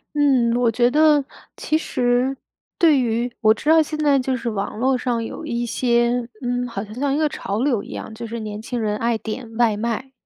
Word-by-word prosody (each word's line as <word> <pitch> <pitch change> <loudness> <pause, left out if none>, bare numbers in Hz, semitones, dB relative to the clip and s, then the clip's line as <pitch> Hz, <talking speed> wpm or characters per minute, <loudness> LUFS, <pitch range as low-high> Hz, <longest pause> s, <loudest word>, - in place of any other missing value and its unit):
嗯， 265 -5 +3
我 240 -2 +2
觉 240 +2 +3
得 300 0 +4 0.3
其 310 - 0
实 250 -2 0 0.4
对 310 -5 +5
于 240 0 0
我 215 0 +6
知 295 - -3
道 320 0 +7
现 305 0 -3
在 290 -2 +3
就 260 0 0
是 235 -1 -3
网 205 0 -4
络 260 +1 +2
上 240 -2 -1
有 315 - -7
一 240 -4 -2
些， 240 0 +1
嗯， 245 0 -1
好 205 -4 -5
像 215 - -12
像 275 +1 0
一 - - 0
个 310 -1 +2
潮 205 -4 -4
流 250 -7 +1
一 - - -12
样， - - -6
就 235 - -6
是 230 +1 -5
年 210 -1 -6
轻 235 +1 -4
人 210 -1 -1
爱 230 +1 0
点 225 +1 -6
外 225 -4 +3
卖， 235 +4 -3
245 Hz, 235 characters per minute, -21 LUFS, 230-270 Hz, 0.4 s, 道